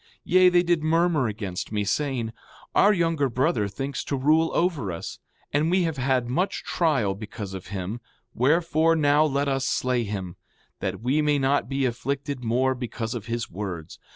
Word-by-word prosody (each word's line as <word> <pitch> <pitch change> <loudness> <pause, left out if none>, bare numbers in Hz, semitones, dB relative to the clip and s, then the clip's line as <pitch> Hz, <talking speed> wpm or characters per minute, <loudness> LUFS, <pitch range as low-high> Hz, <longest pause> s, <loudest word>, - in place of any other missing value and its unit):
5:3 460 - -31 0.2
Yea, 185 0 +5
they 175 -1 +4
did 175 -2 +1
murmur 160 -3 +2
against 100 -4 -5
me, 105 -1 0
saying: 120 +1 -1 0.4
Our 205 - +5
younger 165 -7 +1
brother 125 -3 +1
thinks 135 +7 -4
to 140 - -1
rule 155 +5 +3
over 160 - 0
us; 85 - -6 0.3
and 150 +2 +2
we 185 +1 +3
have 165 -3 -2
had 130 -2 +1
much 175 +11 -1
trial 140 - +1
because 105 -1 -7
of 95 -1 -7
him; 100 +4 -5 0.3
wherefore, 165 +4 +3
now 150 -1 +4
let 140 -1 0
us 135 -1 0
slay 125 -2 0
him, 95 -4 -5 0.4
that 95 0 -3
we 135 +6 +1
may 150 -1 +2
not 135 -3 +1
be 135 -1 0
afflicted 135 +2 -3
more 125 +3 +2
because 120 -2 -4
of 120 -2 -6
his 115 -1 -2
words. 90 -4 -6
135 Hz, 180 wpm, -25 LUFS, 110-155 Hz, 0.4 s, Yea